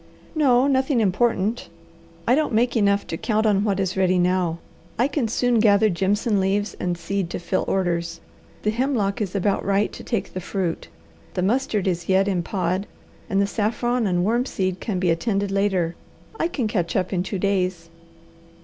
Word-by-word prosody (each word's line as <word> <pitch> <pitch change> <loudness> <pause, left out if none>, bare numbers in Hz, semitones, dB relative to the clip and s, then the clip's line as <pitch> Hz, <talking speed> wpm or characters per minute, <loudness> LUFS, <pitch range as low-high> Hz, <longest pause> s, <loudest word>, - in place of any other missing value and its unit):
"No. 265 -5 +4
Nothing 265 -1 +2
important. 220 +1 +1 0.6
I 240 - +5
don't 295 -4 +1
make 240 +2 +2
enough 200 -2 +2
to 165 - -4
count 220 +2 0
on 205 -2 +3
what 200 -3 0
is 190 -2 -1
ready 185 -1 +2
now. 180 -2 +1 0.4
I 245 - +3
can 285 -5 -1
soon 240 +1 +1
gather 210 -1 +4
jimson 200 +4 +1
leaves 195 +2 0
and 175 -1 -1
seed 190 +1 -2
to - - -3
fill 180 +2 -1
orders, 170 -3 -1 0.4
the 210 - +2
hemlock 230 -4 0
is 200 -2 -3
about 200 +1 +1
right 200 +1 +1
to - - -9
take 230 -6 -3
the 185 - -4
fruit, 180 -2 -3 0.5
the 180 - 0
mustard 215 -2 0
is 175 -1 -2
yet 190 +1 +3
in 185 -3 +1
pod, 185 +2 -2 0.4
and 195 - +1
the 200 - +3
saffron 230 +3 0
and 175 -1 +1
wormseed 205 -5 0
can 210 -5 -3
be 180 -2 +2
attended 200 +3 0
later. 195 -4 +1 0.5
I 330 - +2
can 260 -9 -2
catch 180 -6 -1
up 185 0 0
in 180 - +1
two 195 +2 -3
days." 185 -3 -1
200 Hz, 180 wpm, -23 LUFS, 185-225 Hz, 0.6 s, I